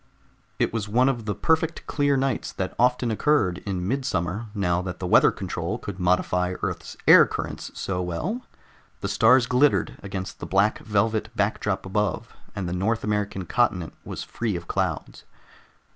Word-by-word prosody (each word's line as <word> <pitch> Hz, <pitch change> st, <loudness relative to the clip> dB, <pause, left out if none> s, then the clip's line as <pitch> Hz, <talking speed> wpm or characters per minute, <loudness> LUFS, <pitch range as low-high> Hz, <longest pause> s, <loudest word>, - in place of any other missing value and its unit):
It -, -, 0 dB
was 105 Hz, -2 st, -3 dB
one 125 Hz, +5 st, +3 dB
of 120 Hz, -5 st, -3 dB
the 105 Hz, -, -1 dB
perfect 160 Hz, 0 st, 0 dB
clear 145 Hz, -1 st, +1 dB
nights 135 Hz, -1 st, -1 dB
that 95 Hz, -, -3 dB
often 125 Hz, -1 st, +2 dB
occurred 110 Hz, -7 st, +2 dB
in 90 Hz, -2 st, -2 dB
midsummer 110 Hz, -4 st, -1 dB
now 90 Hz, -3 st, +1 dB
that 90 Hz, -1 st, -6 dB
weather 90 Hz, -1 st, +5 dB
control -, -, -4 dB
could 100 Hz, -2 st, -7 dB
modify 90 Hz, 0 st, +1 dB
Earth's -, -, -4 dB
air -, -, +9 dB
currents -, -, -5 dB
so 90 Hz, -2 st, -2 dB
well; 155 Hz, -, -3 dB, 0.6 s
the -, -, -2 dB
stars 115 Hz, +6 st, +5 dB
glittered 130 Hz, +4 st, +2 dB
against 95 Hz, -1 st, -6 dB
the -, -, -6 dB
black 100 Hz, +3 st, +2 dB
velvet 110 Hz, +1 st, 0 dB
backdrop 100 Hz, -1 st, -1 dB
above, 100 Hz, -1 st, -2 dB, 0.2 s
and 95 Hz, -3 st, -3 dB
the 85 Hz, -, -3 dB
North 105 Hz, +5 st, 0 dB
American 105 Hz, -3 st, -1 dB
continent 95 Hz, -8 st, 0 dB
was -, -, -6 dB
free 115 Hz, -5 st, -3 dB
of 85 Hz, -1 st, -6 dB
clouds. -, -, -2 dB
105 Hz, 160 wpm, -25 LUFS, 90-120 Hz, 0.6 s, air